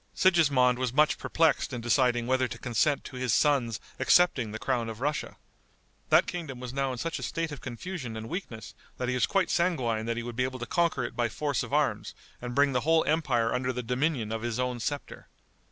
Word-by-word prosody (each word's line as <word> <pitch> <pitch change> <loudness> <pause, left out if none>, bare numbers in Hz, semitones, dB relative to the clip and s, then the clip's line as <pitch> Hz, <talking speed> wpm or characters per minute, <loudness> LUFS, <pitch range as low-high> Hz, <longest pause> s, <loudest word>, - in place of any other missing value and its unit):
Sigismond 140 -9 +4
was 130 -2 0
much 150 +4 +3
perplexed 160 -3 +1
in 125 - -4
deciding 120 0 +2
whether 130 +1 +1
to - - -7
consent 130 +4 0
to 130 - -9
his 125 -2 -1
son's 125 -5 +2 0.2
accepting 140 -11 +3
the 110 - -4
crown 120 -1 -1
of 110 0 -7
Russia. 150 +3 -2 0.7
That - - +5
kingdom 155 -8 -5
was 125 0 -6
now 135 -1 0
in 125 - -5
such 165 +5 -3
a - - -8
state 165 -1 -3
of 145 - -8
confusion 125 -1 -6
and 110 0 -6
weakness 120 - -6 0.2
that 125 -1 -2
he - - 0
was 125 - +2
quite 195 -3 +1
sanguine 125 -11 0
that 115 0 -1
he 120 - -3
would 120 -1 -6
be 125 - +1
able 130 0 -3
to 120 - -5
conquer 170 +4 +1
it - - -5
by 120 -1 0
force 145 +2 -1
of - - -6
arms - - 0 0.3
and 125 0 -5
bring 140 0 +4
the 125 -2 0
whole 160 +3 +3
empire 135 -8 +1
under 125 +1 0
the 125 0 -4
dominion 125 -2 -1
of 115 0 -3
his 120 -1 -2
own 125 -1 -1
scepter. 145 +5 -5
125 Hz, 220 wpm, -28 LUFS, 120-150 Hz, 0.7 s, That